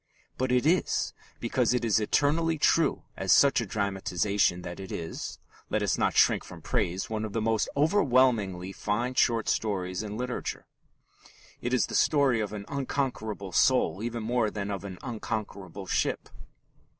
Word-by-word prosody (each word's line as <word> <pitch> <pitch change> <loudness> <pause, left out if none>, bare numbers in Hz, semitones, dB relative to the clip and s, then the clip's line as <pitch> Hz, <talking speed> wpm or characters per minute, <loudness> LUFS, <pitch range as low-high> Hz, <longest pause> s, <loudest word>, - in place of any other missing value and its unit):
But 130 0 -1
it 125 +1 +2
is 175 +4 +1 0.3
because 120 0 +1
it 120 -1 0
is 110 -1 +3
eternally 155 +9 +1
true 155 0 +2
as 95 -2 -1
such 140 -3 +5
a 115 - -4
dramatization 95 -2 0
that 90 +1 -7
it 95 -1 -8
is 80 -1 -5 0.3
let - - 0
us - - +1
not - - 0
shrink - - +4
from - - -11
praise 90 +3 -1
one 110 -1 -3
of 110 -2 -5
the 115 - 0
most 110 0 +1
overwhelmingly 125 - +2
fine 115 +6 -2
short 115 -3 +2
stories 95 -4 -1
in 105 -1 -5
literature. 125 0 -4 1.0
It 120 - -2
is 125 -5 +3
the - - -9
story 140 -6 +3
of 105 -2 -2
an 105 -1 -6
unconquerable 125 -7 -3
soul 95 - +3
even 115 0 -3
more 115 -1 +1
than 100 -1 -4
of 100 -2 -4
an 95 -2 -7
unconquerable 105 -5 -5
ship. - - -1
110 Hz, 160 wpm, -28 LUFS, 100-125 Hz, 1.0 s, such